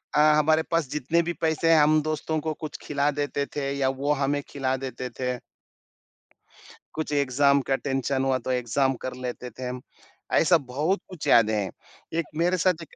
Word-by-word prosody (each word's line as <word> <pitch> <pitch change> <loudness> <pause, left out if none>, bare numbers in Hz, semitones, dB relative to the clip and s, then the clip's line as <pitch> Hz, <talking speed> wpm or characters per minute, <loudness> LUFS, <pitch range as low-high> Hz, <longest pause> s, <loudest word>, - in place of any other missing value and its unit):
अ, - - +4 0.2
हमारे 155 +1 +3
पास 165 -3 +1
जितने 150 +4 +1
भी 175 - -2
पैसे 160 0 +2
हैं, 160 - +7
हम 155 +1 +4
दोस्तों 155 +1 -2
को 155 - 0
कुछ 155 - -6
खिला 145 0 0
देते 145 0 -1
थे 140 -2 -1
या 135 -1 +2
वो 145 - +1
हमें 145 +1 0
खिला 130 -2 -1
देते 130 -1 -5
थे। 125 -1 -1 1.6
कुछ 155 -1 -3
एग्ज़ाम 140 0 +3
का 135 - +4
टेंशन 135 -1 -1
हुआ 135 -1 +2
तो - - +1
एग्ज़ाम 130 +2 +1
कर 130 - -3
लेते 125 0 -5
थे 130 -1 -6
हम, 125 0 -5 0.5
ऐसा 170 +1 +5
बहुत 150 +7 -1
कुछ 180 -5 -7
याद 115 -2 +6
है। 105 -3 0 0.4
एक 165 0 0
मेरे 175 +3 +2
साथ 180 +1 +3
देख 165 - -12
140 Hz, 185 wpm, -26 LUFS, 130-155 Hz, 1.6 s, हैं